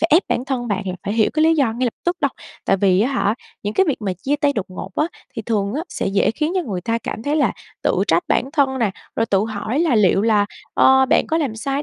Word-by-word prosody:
phải 330 - +2
ép 340 - +6
bản 245 - 0
thân 255 -3 -3
bạn 200 -3 -1
là 185 - -2
phải 205 - -2
hiểu 220 -2 +3
cái 310 - +2
lý 325 +1 +5
do 270 -8 +2
ngay 245 +2 -1
lập 230 - -3
tức 350 +1 +1
đâu. 280 - +2 0.3
Tại 195 - +3
vì 190 -1 +3
á 255 +6 +1
hả, 210 -3 +1 0.3
những 205 +1 -3
cái 385 - +3
việc 285 - +1
mà 195 -3 -1
chia 270 +11 -2
tay 290 -1 +1
đột 210 -8 -2
ngột 185 +1 -7
á 305 - +1 0.3
thì 225 - -4
thường 205 0 -1
á 310 - -1
sẽ - - -3
dễ 195 +1 +2
khiến 305 +8 -2
cho 370 - +1
người 195 - -4
ta 230 +5 -1
cảm 220 - -6
thấy 295 +3 0
là 275 -9 +2 0.3
tự 185 - +1
trách 170 0 +2
bản 265 - +1
thân 270 -4 +1
nè, 225 -5 +1 0.3
rồi 225 - +1
tự 195 - +2
hỏi 220 +3 -3
là 330 -7 +2
liệu 200 -2 +4
là, 210 -2 +3 0.3
ơ, 265 0 +5
bạn - - +3
có 320 - 0
làm 290 -6 0
sai 275 +5 -2
ở - - -2
230 Hz, 290 wpm, -20 LUFS, 205-285 Hz, 0.3 s, ép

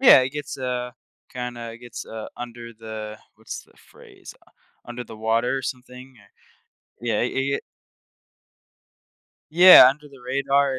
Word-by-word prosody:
Yeah, 250 - +9
it 130 +1 -1
gets, 145 -2 -6
uh, 125 -1 -3 0.4
kinda 120 -2 -6
gets, 120 0 -9
uh, 110 -1 -7
under 120 -1 -8
the, 110 -1 -8 0.2
what's - - -8
the - - -27
phrase - - -15
u - - -28 0.3
under 120 +1 -7
the 110 -1 -11
water 115 +4 0
or 135 - -4
something, 125 0 -8 0.9
yeah, 115 -3 0
ye 135 +3 -1
yeah. - - +1 1.9
Yeah, 175 -5 +10
under 150 +2 -4
the 135 -3 -16
radar, 140 0 +1
125 Hz, 140 wpm, -23 LUFS, 115-135 Hz, 1.9 s, Yeah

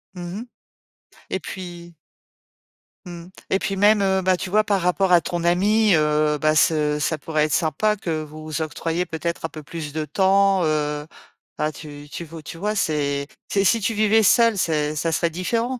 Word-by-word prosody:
Mmh 175 +3 -6
mh 240 - -8 0.8
et 190 - -2
puis 175 -2 -9 1.1
mmh 175 0 -9 0.2
et 190 - +3
puis 195 - -2
même, 200 -2 +3
bah, 185 -1 +2
tu 185 - -5
vois, 215 +1 +4
par 200 -3 0
rapport 180 +2 +1
à 175 -1 +6
ton 170 +1 -3
ami, 205 +4 +3
heu, 150 0 +2
bah 155 +1 +1
ce 150 -2 +2
ça 155 +1 0
pourrait 155 0 0
être 155 - -2
sympa 190 +6 +1
que 165 -5 -3
vous 155 +1 -11
vous 155 +1 -3
octroyiez, 165 +2 -2
peut-être, 165 0 -4
un - - -3
peu 155 -1 -10
plus 155 -1 -7
de 155 +1 -3
temps, 195 +4 +3
heu, 150 -1 -1 0.5
bah 150 0 0
tu 145 -1 -11
tu 170 - -6
veux 160 -1 -10
tu 165 - -9
vois, 210 +2 -1
c'est 140 -6 -1 0.2
si 200 +3 +3
tu 225 +3 0
vivais 215 +1 +4
seul, 230 +2 +5
c'est 155 -4 0
ça 165 +2 -1
serait 165 +2 +1
différent. 230 +8 -2
170 Hz, 185 wpm, -22 LUFS, 155-195 Hz, 1.1 s, à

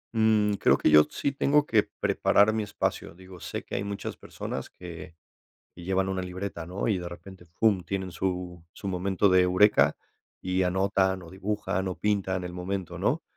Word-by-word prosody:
Mm, 110 -2 +3
creo - - +4
que - - +2
yo 75 0 +8
sí 140 - -2
tengo 145 +2 +2
que 110 -6 +4 0.2
preparar 105 +2 +3
mi 110 - 0
espacio, 105 -4 -3
digo, 95 0 -13
sé - - -5
que - - -13
hay 100 - -1
muchas 100 0 -5
personas - - -6
que 85 -2 -10 0.6
que 90 - -11
llevan 95 +1 0
una 95 -1 -2
libreta, 90 -2 -5
¿no?, 95 +5 -3
y 100 -5 +1
de 85 0 -6
repente, 90 +1 -12
pum, 100 -5 +3
tienen 95 -1 -4
su 90 -1 -3
su 100 - -8
momento 95 +2 +1
de 95 -1 +5
eureka 90 -5 +4 0.4
y 95 0 -1
anotan 95 0 +1
o 85 - -12
dibujan 95 -1 -2
o 90 - -4
pintan 95 -3 0
el 90 - -6
momento, 90 0 -4
¿no? - - 0
95 Hz, 185 wpm, -27 LUFS, 90-100 Hz, 0.6 s, yo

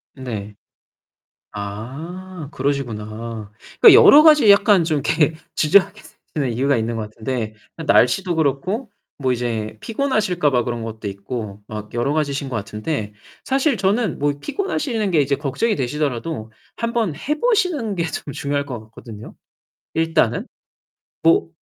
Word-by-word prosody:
네. 105 -6 -6 1.0
아, 145 - -7
그러시구나. 115 -5 -4 0.3
그러니까 - - +10
여러 295 - +9
가지 300 -8 +7
약간 200 -3 +5
좀 155 -2 0
이렇게 155 +2 +1 0.2
주저하게 200 +6 +3 0.3
되는 135 -6 -1
이유가 135 +4 +1
있는 115 0 -2
것 110 - -2
같은데 110 0 -4 0.3
날씨도 175 +6 +3
그렇고 175 - -1 0.3
뭐 130 -2 +1
이제 115 -3 -3
피곤하실까 215 - 0
봐 125 -3 +2
그런 120 -1 -3
것도 110 -2 -6
있고 100 0 -6
막 105 -1 -8
여러 120 +4 0
가지신 140 -3 -1
것 125 - -2
같은데 105 +2 -4 0.3
사실 270 -2 +1
저는 200 - +1
뭐 145 0 +1
피곤하시는 275 - -2
게 160 -5 +4
이제 140 0 0
걱정이 150 - -1
되시더라도 130 -3 -3 0.2
한번 230 -7 -1
해 300 - -3
보시는 360 - +1
게 170 -3 -1
좀 150 -3 -5
중요할 140 0 -2
것 125 -4 -5
같거든요, 110 0 -11 0.6
일단은. 160 -8 +1 0.7
뭐 165 0 +3
140 Hz, 300 characters per minute, -21 LUFS, 115-190 Hz, 1.0 s, 그러니까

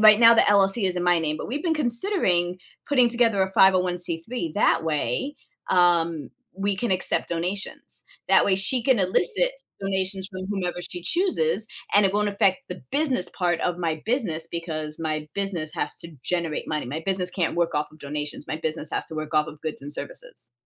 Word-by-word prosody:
right 215 -1 +8
now, 230 0 +8
the 225 - +6
LLC 200 +1 +4
is 185 -1 0
in 175 - -1
my 175 -1 +4
name, 155 -1 -1
but - - -6
we've 280 +6 -3
been 330 -3 +1
considering 235 - +1 0.3
putting 255 -4 +4
together 235 -4 +2
a 190 - -2
501(c)(3), 180 0 +2
that 205 - +3
way, 160 - -1 0.3
um, 170 -3 +2 0.3
we 200 +1 0
can 235 +3 -2
accept 185 0 +1
donations. 180 +4 -4 0.2
That - - +6
way, 190 - +3
she 230 +6 +1
can 255 -1 +3
elicit 450 - +2 0.3
donations 190 0 -1
from 185 -1 -6
whomever 180 -3 -2
she 175 0 -7
chooses, 220 - +1 0.3
and 205 0 +6
it 195 - +2
won't 210 0 +1
affect 200 0 +2
the - - -7
business 275 -9 +1
part 175 -2 0
of 175 -1 -1
my 160 -3 -2
business 185 - 0
because 155 -2 -4
my 155 -1 -3
business 190 -6 -2
has - - -2
to 170 -2 -10
generate 170 -3 -2
money 155 -1 -2
my 150 +6 -4
business 185 -2 0
can't 180 -3 -1
work 170 -1 0
off 150 - 0
of 155 - -17
donations, 150 +1 -5
my 155 - -2
business 160 -1 -4
has - - -1
to - - -7
work 155 0 -5
off 150 0 +3
of 150 -1 -10
goods 155 -1 -5
and 145 +1 -5
services. - - -6
185 Hz, 195 wpm, -24 LUFS, 160-210 Hz, 0.3 s, right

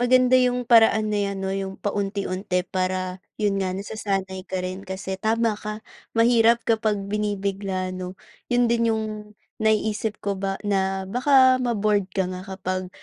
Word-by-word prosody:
Maganda 255 +1 +4
'yong 250 -1 +3
paraan 225 -2 +5
na 205 - +1
'yan, 200 0 -3
'no, 190 - -1
'yong 195 0 -4
paunti-unti 195 -2 -2
para, 185 0 -2 0.2
'yon 205 -2 0
nga, 185 -1 -1
nasasanay 195 -2 -3
ka 185 -1 -2
rin 185 +1 -4
kasi, 190 0 -5
tama 225 +1 +2
ka, 215 +1 -6 0.3
mahirap 230 0 +4
kapag 220 -2 +1
binibigla, 200 -2 -2
ano? 185 0 -6 0.3
'Yon 245 0 +3
din 230 0 +2
'yong 220 0 0 0.6
naiisip 220 0 +1
ko 200 0 0
ba 195 0 -1
na 190 -1 0
baka 260 +3 +4
ma-bored 210 -4 +1
ka 190 - +2
nga 185 - -6
kapag 185 -1 -3
200 Hz, 150 wpm, -24 LUFS, 190-225 Hz, 0.6 s, paraan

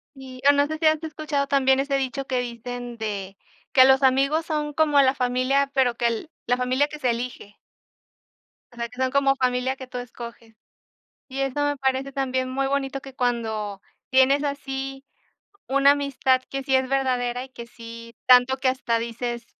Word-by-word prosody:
Sí. 260 -1 -11
O - - +9
no 285 0 +3
sé 315 +1 -4
si 315 - +1
has 310 0 +3
escuchado 305 -3 -2
también 265 -1 +3
ese 275 0 0
dicho 270 0 -3
que 255 -2 0
dicen 245 0 -6
de 200 -3 -4 0.4
que 260 -1 +8
los 265 +1 +5
amigos 275 +5 +2
son 300 -2 -2
como 295 -2 +3
la 265 -1 +4
familia, 255 +2 +1
pero 250 -3 +2
que 240 - 0
el 235 +7 -2 0.2
la 245 - +2
familia 255 +3 +1
que 300 0 -8
se 255 -4 +1
elige. 235 -3 -5 1.2
O - - -18
sea, 235 0 -3
que 250 +2 -11
son 260 0 +1
como 275 0 +3
familia 255 +1 0
que 260 -1 -9
tú 250 0 -6
escoges. 235 -2 -10 0.7
Y 270 0 -5
eso 275 +2 0
me 290 0 0
parece 265 0 -1
también 260 -1 -1
muy 270 +1 -1
bonito, 275 0 -2
que 270 -1 -12
cuando 220 -5 -2 0.3
tienes 265 +2 +4
así 270 -1 -4 0.6
una 275 +1 +5
amistad 275 -2 +1
que 275 0 -3
sí 265 -1 +1
es 260 0 +1
verdadera 250 -2 0
y 265 - -18
que 235 -2 -9
sí 230 0 -11
tanto 250 +1 +6
que 265 0 -1
hasta 250 -3 0
dices: 235 +1 -4
260 Hz, 185 wpm, -24 LUFS, 245-275 Hz, 1.2 s, O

